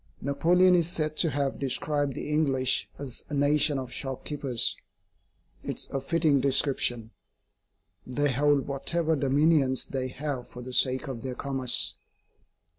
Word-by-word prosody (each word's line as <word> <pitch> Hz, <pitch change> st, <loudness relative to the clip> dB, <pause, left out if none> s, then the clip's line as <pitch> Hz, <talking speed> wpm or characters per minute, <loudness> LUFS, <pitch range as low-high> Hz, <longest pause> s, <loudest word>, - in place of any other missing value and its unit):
Napoleon 175 Hz, +6 st, +3 dB
is 170 Hz, -2 st, +3 dB
said 155 Hz, -3 st, -1 dB
to 165 Hz, -, +3 dB
have 140 Hz, -1 st, -2 dB
described 140 Hz, +1 st, -1 dB
the -, -, -5 dB
English 140 Hz, -4 st, +1 dB
as 135 Hz, -4 st, -5 dB
a 150 Hz, -, -3 dB
nation 145 Hz, 0 st, +2 dB
of 130 Hz, -2 st, -5 dB
shop 135 Hz, -1 st, -5 dB
keepers. 135 Hz, -5 st, -1 dB, 0.9 s
It -, -, -4 dB
is -, -, -7 dB
a 135 Hz, -, -2 dB
fitting 155 Hz, -1 st, +2 dB
description. 130 Hz, -4 st, +1 dB, 1.0 s
They 145 Hz, +3 st, 0 dB
hold 145 Hz, +1 st, +2 dB
whatever 160 Hz, +4 st, 0 dB
dominions 140 Hz, -1 st, +2 dB
they 130 Hz, -1 st, -3 dB
have 135 Hz, -1 st, -5 dB
for 125 Hz, -, -10 dB
the 130 Hz, +1 st, -8 dB
sake 130 Hz, +3 st, +2 dB
of 130 Hz, -4 st, -5 dB
their 130 Hz, -1 st, -5 dB
commerce. 135 Hz, -3 st, 0 dB
140 Hz, 145 wpm, -27 LUFS, 130-150 Hz, 1.0 s, Napoleon